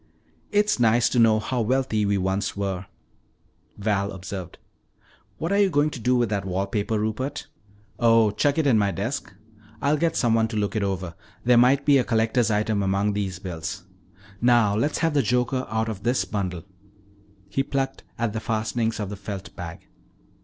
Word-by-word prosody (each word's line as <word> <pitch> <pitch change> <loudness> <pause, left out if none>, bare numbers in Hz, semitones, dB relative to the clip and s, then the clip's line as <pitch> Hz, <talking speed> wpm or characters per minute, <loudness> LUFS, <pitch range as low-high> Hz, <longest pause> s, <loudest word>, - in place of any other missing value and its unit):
"It's 205 -7 +2
nice 115 0 +4
to 125 - +1
know 110 -1 +5
how 125 +3 -2
wealthy 115 -3 +1
we 100 0 +2
once 95 +1 -1
were," 95 -2 -3 0.9
Val 100 -1 0
observed. 95 -1 -7 0.8
"What 165 - -3
are 200 - +3
you 200 -1 +4
going 150 -2 +2
to 130 - -7
do 125 +3 +2
with 120 -1 +2
that 100 -3 -1
wall 95 +1 -1
paper, 105 +2 -1
Rupert?" 130 +8 -3 0.5
"Oh, 115 -2 +5
chuck 145 +7 +1
it 160 - +2
in 120 -6 +4
my 100 -1 +2
desk. 95 +1 -3 0.5
I'll 145 +4 +2
get 165 +2 0
someone 115 -2 +2
to 110 -1 -4
look 105 0 -1
it 110 - 0
over; 95 -3 -2 0.3
there 125 0 +4
might 135 +3 +4
be 140 -2 +5
a - - +2
collector's 115 0 +1
item 105 -1 +1
among 100 +1 +1
these 100 -3 -2
bills. 90 0 -6 0.6
Now 120 -4 +4
let's 145 +8 0
have 165 -2 +1
the 145 - +3
joker 125 +1 0
out 110 +1 -1
of 105 -3 -5
this 120 -3 +1
bundle." 95 -3 -3 0.8
He 100 +7 -1
plucked 135 0 -2
at 115 -2 -1
the 110 - -2
fastenings 110 0 -1
of 105 -2 -3
the - - -4
felt 100 +1 -7
bag. 85 -2 -8
110 Hz, 180 wpm, -24 LUFS, 100-125 Hz, 0.9 s, know